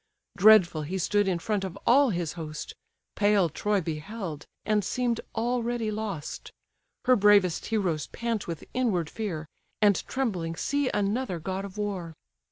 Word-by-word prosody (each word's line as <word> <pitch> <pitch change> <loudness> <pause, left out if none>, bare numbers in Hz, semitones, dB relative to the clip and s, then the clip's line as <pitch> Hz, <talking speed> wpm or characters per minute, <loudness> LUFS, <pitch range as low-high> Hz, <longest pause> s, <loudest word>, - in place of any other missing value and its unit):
Dreadful 195 -5 +6
he 170 +6 -3
stood 205 +3 +1
in 185 -2 +1
front 205 +3 -1
of 190 0 -5
all 275 +2 +5
his 175 -6 -2
host; 155 -3 -6 0.4
Pale 205 -4 +3
Troy 205 +5 0
beheld, 160 0 -5 0.2
and 210 -1 +2
seem'd 240 +3 -1
already 240 -1 -1
lost; 205 -8 -5 0.5
Her 255 0 +6
bravest 205 -5 +4
heroes 185 -9 0
pant 235 -3 -3
with 165 -3 -5
inward 205 -11 0
fear, 180 -9 -4 0.3
And 205 -3 +4
trembling 185 -11 -2
see 285 +7 0
another 205 0 -1
god 190 +4 -3
of 200 +1 -10
war. 190 -6 -3
200 Hz, 145 wpm, -27 LUFS, 170-220 Hz, 0.5 s, Dreadful